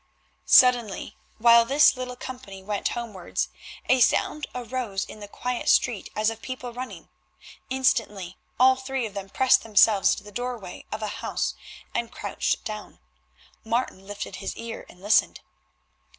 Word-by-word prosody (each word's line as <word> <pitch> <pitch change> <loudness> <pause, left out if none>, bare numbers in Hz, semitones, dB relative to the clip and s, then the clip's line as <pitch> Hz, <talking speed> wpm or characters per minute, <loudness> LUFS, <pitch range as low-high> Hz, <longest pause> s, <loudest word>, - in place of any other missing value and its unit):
Suddenly 245 -5 +5 0.2
while 235 +1 +7
this 275 +6 +5
little 250 0 -5
company 245 -7 -9
went 205 0 -1
homewards 215 -7 -3 0.4
a 260 - +4
sound 295 +4 +2
arose 240 -5 -3
in - - -11
the 205 - -8
quiet 250 +4 -3
street 235 -6 +2
as 215 +1 +2
of 225 0 -9
people 255 -2 -6
running. 255 +2 -8 0.6
Instantly 215 -8 0 0.2
all 260 +1 +7
three 260 -1 -3
of 210 - -7
them 195 -1 -6
pressed 260 +5 +4
themselves 210 -2 +4
into - - -6
the 210 - -12
doorway 240 -4 -5
of 215 0 -4
a - - -1
house - - -1 0.4
and 235 -1 -2
crouched - - -2
down. 215 -1 -7 0.7
Martin 225 -4 -2
lifted 205 -2 -6
his 195 0 -5
ear 230 0 -7
and 180 - -17
listened. 215 +1 +3
230 Hz, 150 wpm, -25 LUFS, 205-250 Hz, 0.7 s, while